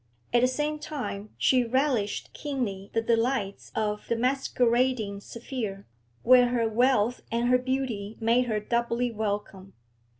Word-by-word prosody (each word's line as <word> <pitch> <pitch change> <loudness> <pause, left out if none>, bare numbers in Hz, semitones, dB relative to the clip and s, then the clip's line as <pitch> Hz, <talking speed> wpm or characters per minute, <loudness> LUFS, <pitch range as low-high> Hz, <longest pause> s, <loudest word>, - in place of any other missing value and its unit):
At 240 - +5
the 250 - +5
same 300 +4 -2
time 265 -9 -5
she 255 -2 +3
relished 245 -4 0
keenly 225 -9 -4
the 225 - 0
delights 230 -3 0
of 210 -1 -2
the 235 - +1
masquerading 245 -3 +1
sphere, 220 -3 -6 0.4
where 250 0 +7
her 240 -2 +1
wealth 245 0 +2
and 235 +1 +1
her 250 0 +5
beauty 250 -5 -3
made 235 +2 +3
her 215 -2 0
doubly 235 +2 0
welcome. 205 -3 -4
235 Hz, 135 wpm, -27 LUFS, 210-255 Hz, 0.4 s, where